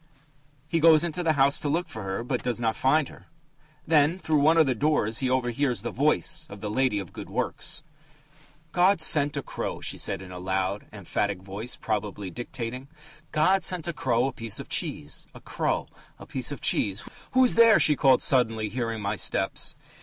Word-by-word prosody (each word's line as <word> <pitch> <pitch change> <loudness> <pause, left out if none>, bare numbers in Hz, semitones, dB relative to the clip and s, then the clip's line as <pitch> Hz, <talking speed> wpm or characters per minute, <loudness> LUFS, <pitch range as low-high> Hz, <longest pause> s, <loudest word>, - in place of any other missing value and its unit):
He 165 +1 0
goes 160 -1 +6
into 170 0 -2
the 165 -2 +2
house 140 -1 +3
to 145 - -2
look 170 +5 0
for 110 - -8
her, 95 +3 -4
but 125 0 -2
does 120 -2 -2
not 115 -2 0
find 145 +2 +2
her. - - -16 0.6
Then 155 +2 +3
through 160 -5 +1
one 155 +3 +4
of 160 - +6
the 130 - +1
doors 120 -4 +1
he 130 - 0
overhears 125 -2 0
the 120 - -3
voice 140 - +1
of 100 - -10
the 105 +1 -4
lady 130 -1 +1
of 95 -4 -5
the - - -25
good - - -8
works: 150 - -3 0.9
"'God... 180 +1 +3
sent... 145 -2 +3
a 140 - -3
crow,'" - - -5
she - - -2
said 95 -1 -3
in 90 - -11
a 90 - -7
loud, 95 +2 -2
emphatic 100 -1 -3
voice, 100 +5 -5
probably 105 -3 -4
dictating 120 +4 -6 0.4
"'God 185 +6 +3
sent 175 -3 0
a 170 - -2
crow 125 -4 +1
a 135 - -1
piece 115 -3 -5
of - - -8
cheese.... - - -3
A - - -10
crow... - - -2 0.3
A - - -12
piece - - -2
of - - -6
cheese... 100 0 0 0.3
Who's 255 -1 +6
there?" 230 -1 +6
she 150 - +4
called 135 -2 +4
suddenly, 115 -5 +2
hearing 115 -2 -3
my 100 +2 -1
steps. - - -1
125 Hz, 200 wpm, -26 LUFS, 105-155 Hz, 0.9 s, goes